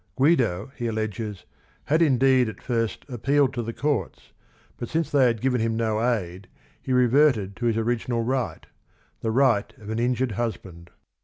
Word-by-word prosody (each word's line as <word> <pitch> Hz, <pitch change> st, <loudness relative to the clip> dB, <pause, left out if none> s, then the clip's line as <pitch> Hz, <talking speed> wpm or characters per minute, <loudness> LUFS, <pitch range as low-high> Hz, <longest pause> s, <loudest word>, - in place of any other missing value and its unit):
Guido, 130 Hz, -, +2 dB
he 120 Hz, -, -3 dB
alleges, 110 Hz, -2 st, -4 dB, 0.4 s
had 155 Hz, +3 st, +2 dB
indeed 130 Hz, -4 st, +4 dB
at -, -, -9 dB
first 115 Hz, -3 st, -2 dB
appealed 135 Hz, +2 st, +1 dB
to 120 Hz, -, -2 dB
the 115 Hz, 0 st, -4 dB
courts, 135 Hz, -, -3 dB, 0.5 s
but 120 Hz, -, -6 dB
since 160 Hz, -2 st, -1 dB
they 140 Hz, -3 st, +4 dB
had 115 Hz, -3 st, -1 dB
given 125 Hz, -3 st, +1 dB
him 115 Hz, 0 st, 0 dB
no 110 Hz, -1 st, 0 dB
aid 95 Hz, -6 st, -2 dB, 0.3 s
he 130 Hz, -, -5 dB
reverted 125 Hz, -5 st, +3 dB
to 120 Hz, -, -1 dB
his 115 Hz, -1 st, +1 dB
original 115 Hz, +1 st, -1 dB
right, 130 Hz, +1 st, -2 dB, 0.3 s
— -, -, -38 dB
the 110 Hz, -, -1 dB
right 115 Hz, -3 st, +2 dB
of 110 Hz, -2 st, -8 dB
an 110 Hz, -, -2 dB
injured 125 Hz, +1 st, 0 dB
husband. 95 Hz, -6 st, -5 dB
120 Hz, 170 wpm, -25 LUFS, 110-130 Hz, 0.5 s, indeed